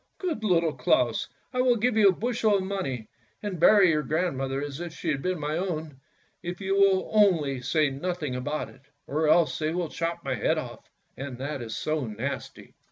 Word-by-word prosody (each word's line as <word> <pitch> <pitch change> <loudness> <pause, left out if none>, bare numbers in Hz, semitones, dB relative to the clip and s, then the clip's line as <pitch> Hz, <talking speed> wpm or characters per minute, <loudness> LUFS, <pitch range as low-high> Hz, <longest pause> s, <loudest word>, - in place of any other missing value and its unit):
Good 330 - -3
Little 170 -6 +2
Claus, 125 -2 +1 0.3
I 250 - +2
will 250 -1 +4
give 235 +1 +1
you 215 -2 +6
a - - +5
bushel 220 +1 +1
of 190 - -2
money, 180 - -3 0.4
and 195 -5 -3
bury 200 -1 +6
your 155 -1 +1
grandmother 135 -3 -1
as 145 0 -5
if 175 -2 -6
she 165 - -4
had 140 -3 0
been 180 0 -1
my 150 +1 -2
own, 160 -6 -3 0.4
if 175 +1 -5
you 195 -1 -1
will 195 -1 +3
only 165 -11 +3
say 150 +2 +1
nothing 150 -1 -3
about 145 +4 -3
it, 130 - -17 0.2
or 155 +2 0
else 165 +1 +3
they 155 0 0
will 175 -1 -2
chop 170 +2 -3
my - - 0
head - - +1
off, - - -7 0.3
and 135 -2 -6
that 140 +1 -4
is 110 -2 -5
so 155 -4 -1
nasty." 130 +6 -6
160 Hz, 200 wpm, -27 LUFS, 140-190 Hz, 0.4 s, you